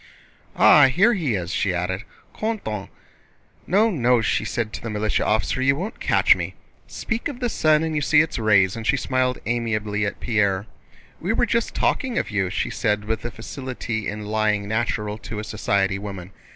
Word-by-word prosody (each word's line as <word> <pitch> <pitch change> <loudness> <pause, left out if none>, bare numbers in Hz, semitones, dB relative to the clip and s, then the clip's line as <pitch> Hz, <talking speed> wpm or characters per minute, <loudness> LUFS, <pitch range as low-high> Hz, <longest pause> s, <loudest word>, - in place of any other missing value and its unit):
"Ah, 145 -3 +7
here 195 - +4
he 155 - 0
is!" 90 -1 -3
she 95 -3 0
added. 90 +3 -2 0.3
"Quand 220 0 -2
on... 105 -2 -4 0.8
No, 210 +6 +3
no," 125 - +3
she 110 - 0
said 110 0 -3
to - - -6
the 115 - -5
militia 105 0 0
officer, 110 +4 0
"you 135 +1 +3
won't 190 +9 -5
catch - - +4
me. - - -5 0.3
Speak 235 -1 -3
of 275 -4 -7
the 245 -2 -1
sun 155 -6 +3
and 160 -1 -2
you 150 - 0
see 150 +1 +5
its 155 -5 -2
rays!" 100 -3 +3
and 115 0 -5
she 140 - +3
smiled 130 -1 0
amiably 110 -3 -1
at - - -5
Pierre. 100 -4 +1 0.5
"We 190 +6 -1
were 240 - +2
just 235 0 -1
talking 255 -3 0
of - - -1
you," 95 -3 0
she - - -2
said 105 0 -1
with 110 +1 -2
the 120 - -4
facility 120 -2 -5
in 105 +1 -5
lying 105 -1 0
natural 110 -1 -2
to 105 +1 -7
a 105 - -3
society 100 -2 0
woman. 100 -3 -7
110 Hz, 190 wpm, -23 LUFS, 105-145 Hz, 0.8 s, Ah